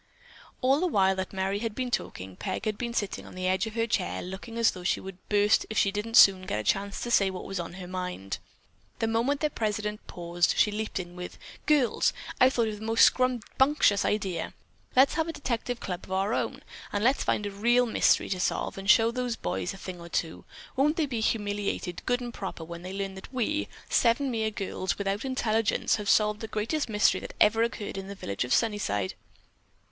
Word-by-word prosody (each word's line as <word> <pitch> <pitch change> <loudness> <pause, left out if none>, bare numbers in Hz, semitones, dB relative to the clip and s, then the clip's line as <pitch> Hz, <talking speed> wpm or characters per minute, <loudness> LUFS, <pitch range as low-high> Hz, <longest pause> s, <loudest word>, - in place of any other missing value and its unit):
'" - - -22
All 270 +2 +4
the 365 - +1
while 190 - +3
that 190 0 -3
Merry 195 +1 -1
had 225 -1 -3
been 255 -1 -2
talking, 95 - -3
Peg 210 - -4
had 215 -1 0
been 235 +2 -4
sitting 205 -4 -2
on - - -12
the 185 0 -3
edge 190 +4 +1
of 220 - -8
her 230 0 +1
chair 90 - -1
looking 190 +6 -7
as 230 -1 +4
though 180 - -9
she 180 - +1
would 190 -1 -9
burst 205 0 +4
if 220 - -4
she 195 - +3
didn't 210 +3 0
soon 185 -1 +7
get 105 - -1
a - - -3
chance 195 - 0
to 240 - -3
say 195 -4 +4
what 185 -1 -6
was 195 -2 -4
on 170 0 -5
her 185 0 -8
mind. 180 - -4 0.6
The - - 0
moment 235 +6 +1
their 300 -1 +1
president 210 -2 -3
paused, 175 0 0
she 210 - +4
leaped 215 -1 -3
in 175 -1 -7
with: 180 0 -7 0.3
"Girls, 290 -6 +3 0.3
I've 255 +1 +6
thought 235 -3 +1
of 210 -1 -6
the - - -8
most 225 0 +6
scrumbunctious 255 -2 +2
idea! 195 -4 -1 0.4
Let's 265 +2 +6
have 320 0 0
a 330 - -3
detective 245 -3 -3
club 180 -1 -5
of - - -13
our 195 +3 +1
own, - - -2 0.3
and 205 0 -1
let's 260 +4 +3
find 210 - 0
a 205 - -3
real 240 +5 +3
mystery 225 - +3
to 185 - -1
solve 195 - -1
and 195 +1 -5
show 225 +2 +6
those 250 -1 -2
boys 95 - -3
a - - -9
thing 180 -2 -8
or 170 - -9
two. 165 -1 -3 0.3
Won't 295 +4 +3
they 320 - +2
be 250 -5 -3
humiliated, 205 -4 -1
good 245 0 +1
and 240 -1 -5
proper, 190 -5 -6
when 170 +1 -8
they 180 +1 -7
learn 195 0 -3
that 190 +4 -11
we, 270 +4 -1 0.2
seven 255 +3 +2
mere 220 -2 0
girls, 190 -3 -3
without 200 +1 -2
intelligence, 225 -6 +1
have 205 -2 -3
solved 210 -1 +3
the 225 - -5
greatest 230 +7 -2
mystery 210 -1 +3
that - - -8
ever 225 +2 +5
occurred 225 -4 -2
in 195 - -7
the 200 - -7
village 100 - -3
of 125 - -6
Sunnyside." 200 - +1
210 Hz, 220 wpm, -28 LUFS, 190-235 Hz, 0.6 s, soon